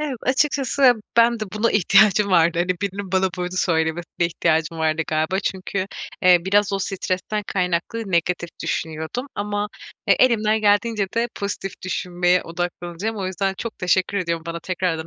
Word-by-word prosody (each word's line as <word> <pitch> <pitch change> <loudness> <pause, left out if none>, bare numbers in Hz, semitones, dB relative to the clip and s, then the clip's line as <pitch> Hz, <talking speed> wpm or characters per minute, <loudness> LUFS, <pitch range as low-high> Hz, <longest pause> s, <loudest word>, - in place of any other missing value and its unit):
Ev 300 -3 -2
açıkçası, 270 -1 +3 0.2
ben 235 0 +4
de 215 - -1
buna 220 +2 +1
ihtiyacım 205 +1 +4
vardı, 170 -1 +4
hani, 175 - +1
birinin 195 -1 -4
bana 190 0 +2
böyle 180 +1 -3
söylemesine 170 0 0
ihtiyacım 165 -1 0
vardı 160 0 +1
galiba. 160 +5 0
Çünkü, 190 0 -3 0.4
eee, 180 -1 +7
biraz 205 +1 +2
o 195 - 0
stresten 195 +2 -2
kaynaklı 185 +3 -2
negatif 170 0 0
düşünüyordum 160 - -3
ama, 205 0 -2 0.4
e, - - +6
elimden 220 -3 +3
geldiğince 205 0 +2
de 230 +1 +1
pozitif 195 -1 -4
düşünmeye 180 0 +1
odaklanacağım. 175 +4 -4
O 195 -2 -3
yüzden 190 +1 -1
çok 230 -1 -6
teşekkür 185 +2 +1
ediyorum 170 -3 -2
bana 170 0 -4
tekrardan 175 -3 -2
185 Hz, 150 wpm, -22 LUFS, 175-210 Hz, 0.4 s, eee